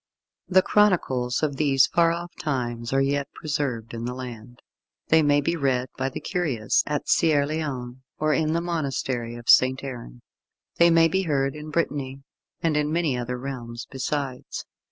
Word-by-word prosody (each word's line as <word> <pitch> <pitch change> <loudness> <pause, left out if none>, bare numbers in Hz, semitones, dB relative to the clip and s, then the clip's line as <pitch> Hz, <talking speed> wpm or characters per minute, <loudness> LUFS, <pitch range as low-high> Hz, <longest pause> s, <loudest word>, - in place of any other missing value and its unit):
The 185 0 +4
chronicles 135 -12 +2
of 140 -3 0
these 140 -2 +4
far 170 -1 +3
off 170 +1 -4
times 120 -5 -2
are 135 0 +3
yet 140 0 -1
preserved 135 -7 -3
in 115 0 -4
the 125 +1 -4
land. 120 -2 -8 0.5
They 160 0 +6
may 145 -1 +3
be 165 +4 0
read 130 -4 0
by 135 0 -1
the - - -6
curious 140 - 0
at 150 -1 -2
Caerleon, 145 -5 0 0.2
or 155 0 +1
in 155 0 +1
the 170 - +1
monastery 135 -8 -2
of 120 0 -11
St. 130 +1 +5
Aaron. 115 - -8 0.5
They 170 0 +6
may 165 -1 +5
be 190 +4 0
heard 140 -5 0
in 150 0 -8
Brittany, 140 -4 -2 0.4
and 165 -2 +2
in 150 0 +1
many 165 -4 +1
another 125 0 -3
realm 125 -3 -6 0.2
besides. 135 -1 -4
140 Hz, 165 wpm, -25 LUFS, 125-155 Hz, 0.5 s, They